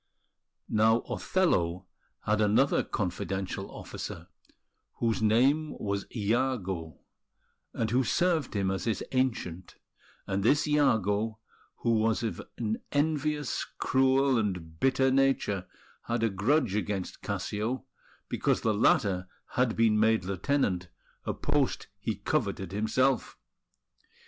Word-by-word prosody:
Now, 110 Hz, +2 st, +3 dB
Othello 90 Hz, -, 0 dB, 0.4 s
had 105 Hz, 0 st, +2 dB
another 110 Hz, +7 st, +3 dB
confidential 95 Hz, -1 st, -3 dB
officer, -, -, -7 dB, 0.7 s
whose 115 Hz, -2 st, 0 dB
name 135 Hz, +8 st, +3 dB
was 100 Hz, -1 st, -3 dB
Iago, 100 Hz, -, -1 dB, 0.7 s
and 110 Hz, -1 st, -2 dB
who 130 Hz, +2 st, +3 dB
served 165 Hz, -3 st, +1 dB
him 95 Hz, -1 st, +1 dB
as 95 Hz, -, -3 dB
his 110 Hz, -4 st, -1 dB
Ancient; 110 Hz, -9 st, -1 dB, 0.5 s
and 100 Hz, 0 st, -1 dB
this 145 Hz, +10 st, +3 dB
Iago, 110 Hz, -7 st, +2 dB, 0.4 s
who 115 Hz, -2 st, +2 dB
was 110 Hz, +1 st, +1 dB
of 115 Hz, -, -3 dB, 0.2 s
an 110 Hz, -2 st, -2 dB
envious, 150 Hz, -1 st, 0 dB
cruel, 130 Hz, -1 st, +3 dB
and 90 Hz, -7 st, -3 dB
bitter 135 Hz, 0 st, +3 dB
nature, 130 Hz, -8 st, +1 dB, 0.4 s
had 120 Hz, -1 st, 0 dB
a 115 Hz, -, +2 dB
grudge 115 Hz, +4 st, +1 dB
against 100 Hz, -3 st, -3 dB
Cassio, 110 Hz, +6 st, -3 dB, 0.4 s
because -, -, 0 dB
the 110 Hz, -, +2 dB
latter 95 Hz, -3 st, +2 dB, 0.2 s
had 125 Hz, -2 st, +1 dB
been 110 Hz, -2 st, +3 dB
made 110 Hz, -2 st, +3 dB
lieutenant, 95 Hz, -2 st, 0 dB, 0.4 s
a -, -, -1 dB
post -, -, 0 dB
he -, -, -2 dB
coveted 95 Hz, -2 st, -2 dB
himself. 120 Hz, +6 st, +1 dB
110 Hz, 115 wpm, -29 LUFS, 100-130 Hz, 0.7 s, Now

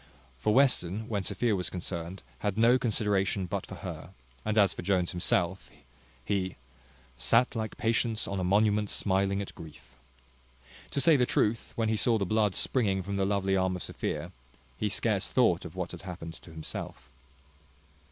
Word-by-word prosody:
For 105 Hz, -, +1 dB
Western, 110 Hz, -5 st, +3 dB
when 105 Hz, -3 st, -1 dB
Sophia 110 Hz, +3 st, 0 dB
was 90 Hz, -2 st, -2 dB
concerned, 90 Hz, 0 st, -5 dB, 0.2 s
had 105 Hz, -1 st, -1 dB
no 120 Hz, +3 st, +5 dB
consideration 100 Hz, -4 st, +1 dB
but 95 Hz, +1 st, -4 dB
for 95 Hz, -, -8 dB
her; 80 Hz, -3 st, -6 dB, 0.3 s
and 110 Hz, 0 st, -1 dB
as 100 Hz, -3 st, +5 dB
for -, -, -6 dB
Jones 95 Hz, -3 st, +1 dB
himself, 90 Hz, +1 st, 0 dB, 0.6 s
he 95 Hz, +2 st, -1 dB, 0.6 s
"sat 115 Hz, -, +3 dB
like 110 Hz, -1 st, -3 dB
patience 115 Hz, -1 st, +1 dB
on 100 Hz, -, -2 dB
a -, -, -1 dB
monument 105 Hz, +2 st, +3 dB
smiling 100 Hz, 0 st, +1 dB
at -, -, -10 dB
grief." 80 Hz, -2 st, -13 dB, 1.0 s
To -, -, -2 dB
say 155 Hz, +1 st, +6 dB
the 125 Hz, -2 st, +2 dB
truth, 110 Hz, +2 st, 0 dB
when 115 Hz, -1 st, 0 dB
he 110 Hz, -, +1 dB
saw 115 Hz, +2 st, +3 dB
the 100 Hz, -, -1 dB
blood 105 Hz, 0 st, +1 dB
springing 100 Hz, -7 st, +1 dB
from 100 Hz, +2 st, -3 dB
the 95 Hz, -, +2 dB
lovely 100 Hz, -1 st, +1 dB
arm 95 Hz, -1 st, +1 dB
of 90 Hz, -, -5 dB
Sophia, -, -, -4 dB, 0.4 s
he -, -, -1 dB
scarce -, -, 0 dB
thought -, -, +3 dB
of -, -, -9 dB
what -, -, -3 dB
had -, -, -9 dB
happened 90 Hz, -3 st, -7 dB
to 85 Hz, -, -14 dB
himself. 80 Hz, -1 st, -7 dB
100 Hz, 170 wpm, -29 LUFS, 95-110 Hz, 1.0 s, say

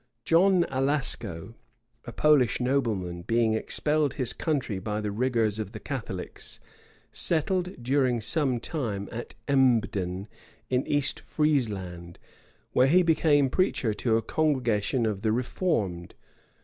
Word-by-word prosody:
John 180 Hz, +1 st, +4 dB
Alasco, 130 Hz, -, -2 dB, 0.5 s
a 120 Hz, -, -6 dB
Polish 140 Hz, -5 st, +3 dB
nobleman, 110 Hz, -10 st, -1 dB
being 115 Hz, +3 st, +1 dB
expelled 150 Hz, +6 st, 0 dB
his 130 Hz, -4 st, -1 dB
country 135 Hz, -, -2 dB
by 105 Hz, +2 st, -3 dB
the 105 Hz, -1 st, -3 dB
rigors 110 Hz, -2 st, 0 dB
of 105 Hz, -1 st, -5 dB
the -, -, -7 dB
Catholics, 110 Hz, -9 st, -4 dB, 0.5 s
settled 180 Hz, -2 st, +1 dB
during 130 Hz, -1 st, +2 dB
some 130 Hz, +1 st, +1 dB
time 115 Hz, -, -4 dB
at 120 Hz, +1 st, -7 dB
Embden 105 Hz, -8 st, +1 dB, 0.4 s
in 125 Hz, +1 st, +1 dB
East 145 Hz, -1 st, +1 dB
Friezland, 100 Hz, -, -2 dB, 0.5 s
where 130 Hz, -, +4 dB
he 180 Hz, +6 st, +5 dB
became 155 Hz, -4 st, +3 dB
preacher 160 Hz, -, +1 dB
to 110 Hz, +2 st, +1 dB
a 115 Hz, -, -2 dB
congregation 125 Hz, -5 st, 0 dB
of 105 Hz, -3 st, -2 dB
the 110 Hz, -1 st, +1 dB
reformed. 110 Hz, -, -2 dB
125 Hz, 125 wpm, -27 LUFS, 105-145 Hz, 0.5 s, he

